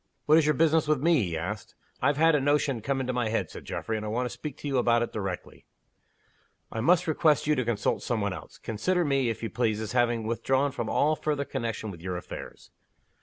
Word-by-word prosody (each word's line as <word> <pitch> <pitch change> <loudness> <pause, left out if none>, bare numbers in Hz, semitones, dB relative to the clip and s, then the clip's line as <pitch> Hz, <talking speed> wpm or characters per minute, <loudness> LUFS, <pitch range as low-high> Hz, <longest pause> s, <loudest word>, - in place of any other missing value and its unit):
"What 155 +2 +6
is 155 - +1
your 150 - +3
business 160 +1 +3
with 155 -2 +2
me?" 165 -4 +4
he 85 -5 -2
asked. 105 +6 -5 0.3
"I've 140 +2 +2
had 165 +1 +5
a 150 - +3
notion 145 -3 +1
come 135 +4 -1
into 130 0 -2
my 120 -3 0
head," 110 - -1
said - - -10
Geoffrey. 110 - -3
"And 105 - -5
I 105 - -3
want 120 +4 -1
to 125 - -4
speak 150 -2 -7
to - - -6
you 135 -2 +1
about 120 -1 +3
it - - -5
directly." 95 -4 -5 1.0
"I 110 - -3
must 175 +7 +4
request 155 -1 +2
you 150 - +3
to 130 -3 0
consult 115 -3 0
some 120 -2 -1
one 100 -2 -1
else. - - -10
Consider 175 - 0
me, 135 -4 +2
if 115 - -4
you 115 - -3
please, 110 -3 0
as 110 -1 -4
having 120 -2 +1
withdrawn 130 +5 +1
from 120 -5 -4
all 155 +2 +2
further 150 -2 -1
connection 115 -5 -3
with 85 -3 -11
your 90 0 -3
affairs." 90 - -9
125 Hz, 235 wpm, -28 LUFS, 110-150 Hz, 1.0 s, What